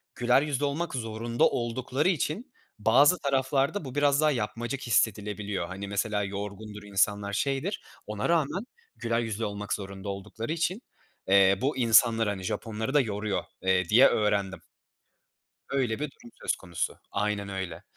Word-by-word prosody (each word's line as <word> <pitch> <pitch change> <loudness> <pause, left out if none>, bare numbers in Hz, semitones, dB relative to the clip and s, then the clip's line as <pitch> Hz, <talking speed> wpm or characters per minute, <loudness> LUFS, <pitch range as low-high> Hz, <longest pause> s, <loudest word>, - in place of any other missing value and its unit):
güler 125 +2 +4
yüzlü 145 -1 -1
olmak 155 +4 -2
zorunda 115 0 -2
oldukları 125 +6 -1
için 190 - -2 0.3
bazı 135 +11 +5
taraflarda 140 +5 0
bu 130 0 -7
biraz 145 0 +3
daha 155 -1 +4
yapmacık 120 +2 -3
hissedilebiliyor. 105 -4 0
Hani, 95 +2 -6
mesela 105 0 -1
yorgundur 105 +1 -6
insanlar, 100 0 0
şeydir, 140 - -1 0.2
ona 105 +4 -2
rağmen 170 - +1 0.3
güler 115 0 -1
yüzlü 115 -1 -2
olmak 105 0 -3
zorunda 100 0 -5
oldukları 105 +5 -5
için, 175 +6 -1 0.5
eee, 95 0 +6
bu 135 +1 0
insanları, 115 -2 +5
hani 100 -2 -4
Japonları 110 +5 -3
da 145 - +6
yoruyor, 105 -3 -2 0.2
eee, 95 -1 +2
diye 125 +6 +8
öğrendim. 100 -3 0 1.1
Öyle 130 -4 0
bir 150 -2 -3
durum 120 - -16
söz - - 0
konusu. 85 -4 -4
Aynen 100 0 -1
öyle. 95 -4 -5
110 Hz, 145 wpm, -28 LUFS, 100-135 Hz, 1.1 s, diye